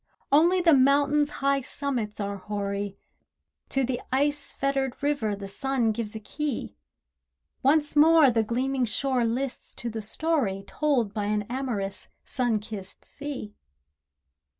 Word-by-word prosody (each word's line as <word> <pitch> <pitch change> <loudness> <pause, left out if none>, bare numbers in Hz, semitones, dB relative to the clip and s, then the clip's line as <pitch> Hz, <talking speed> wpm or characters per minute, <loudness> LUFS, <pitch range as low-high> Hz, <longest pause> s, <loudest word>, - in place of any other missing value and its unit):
Only 340 +6 +5
the 335 -2 +6
mountains' 285 +2 +4 0.2
high 275 0 +3
summits 250 -6 -3
are 200 0 -2
hoary, 200 0 -3 0.7
To 270 - +1
the 250 -1 -1
ice 285 +2 0
fettered 270 -2 -1
river 280 -8 0
the 200 0 -7
sun 255 +1 0
gives 215 0 -4
a - - -4
key. 290 +4 -4 0.9
Once 295 +2 +3
more 310 -2 +7
the 225 -1 +2
gleaming 255 +3 0
shore 250 +2 0
lists 250 +3 -3
to 235 - -4
the 220 0 -4
story 220 -4 0
Told 250 -6 0
by 210 -2 -2
an 210 0 0
amorous 235 -7 -3 0.2
Summer 245 -4 0
kissed 210 -2 -8
sea. 280 -8 -6
255 Hz, 135 wpm, -27 LUFS, 210-285 Hz, 0.9 s, more